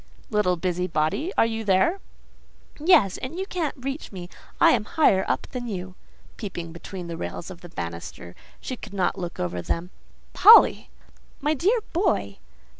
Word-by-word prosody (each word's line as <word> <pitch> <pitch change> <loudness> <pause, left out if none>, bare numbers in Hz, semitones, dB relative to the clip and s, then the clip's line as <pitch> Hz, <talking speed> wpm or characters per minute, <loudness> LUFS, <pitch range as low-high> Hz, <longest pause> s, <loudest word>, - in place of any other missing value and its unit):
"Little 210 -4 +2
busybody! 180 - -1
Are - - +5
you 225 -1 -3
there?" 210 - +2 0.8
"Yes—and 295 - +3
you 380 - -2
can't 340 -7 -3
reach 270 +3 -5
me: 180 -3 -8 0.3
I - - +7
am 225 -4 +2
higher 295 - +3
up - - -1
than 245 -1 -5
you" 185 -3 -5 0.4
(peeping 175 -5 -6
between 175 +2 -8
the 170 -1 -6
rails 175 +2 -6
of 175 - -11
the 175 - -11
banister; 85 - -7 0.3
she 255 - -5
could 210 -4 -11
not 185 -1 0
look 175 -1 -6
over 90 0 -2
them). 170 - -3 0.4
"Polly!" 450 +2 +7 0.5
"My 300 +2 +1
dear 400 - +1
boy!" 335 - 0
195 Hz, 155 wpm, -25 LUFS, -, 0.8 s, I